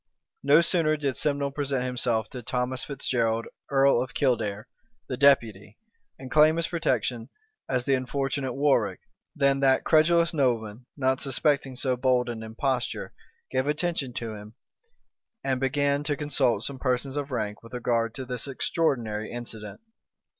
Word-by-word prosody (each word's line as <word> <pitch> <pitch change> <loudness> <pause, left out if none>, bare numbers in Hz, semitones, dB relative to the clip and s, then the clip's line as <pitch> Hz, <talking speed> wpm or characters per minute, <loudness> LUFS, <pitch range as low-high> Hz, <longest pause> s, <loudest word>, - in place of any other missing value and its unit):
No 145 +4 +6
sooner 165 -3 +2
did 140 -3 -1
Simnel 140 -2 0
present 135 -2 -2
himself 120 -3 0
to 125 - -6
Thomas 125 +1 -2
Fitzgerald, 115 -5 -1 0.2
earl 135 -3 +4
of 130 - -6
Kildare, 110 -6 0 0.4
the 130 - -3
deputy, 115 -7 +2 0.4
and 130 -1 -10
claim 155 +2 +6
his 165 0 0
protection 130 -7 -1 0.4
as 125 -2 0
the 135 - +1
unfortunate 135 0 -1
Warwick, 125 -9 +1 0.3
than 140 -1 +2
that 135 -1 +3
credulous 170 +1 +4
nobleman, 120 -5 -1
not 130 -1 +1
suspecting 140 0 0
so 130 0 0
bold 125 -1 +1
an 115 -2 -5
imposture, 120 +3 -2 0.4
gave 130 +1 0
attention 150 -3 -1
to 115 -2 -4
him, 105 +1 -11 0.9
and 130 -2 0
began 140 +2 +1
to 145 -1 -1
consult 130 -7 +1
some 135 0 -5
persons 130 +1 -1
of 145 -1 -3
rank 105 -5 -3
with 115 +2 -10
regard 115 -2 0
to 130 - -6
this 125 +1 -4
extraordinary 120 -7 -1
incident. 115 - -7
130 Hz, 145 wpm, -26 LUFS, 120-140 Hz, 0.9 s, No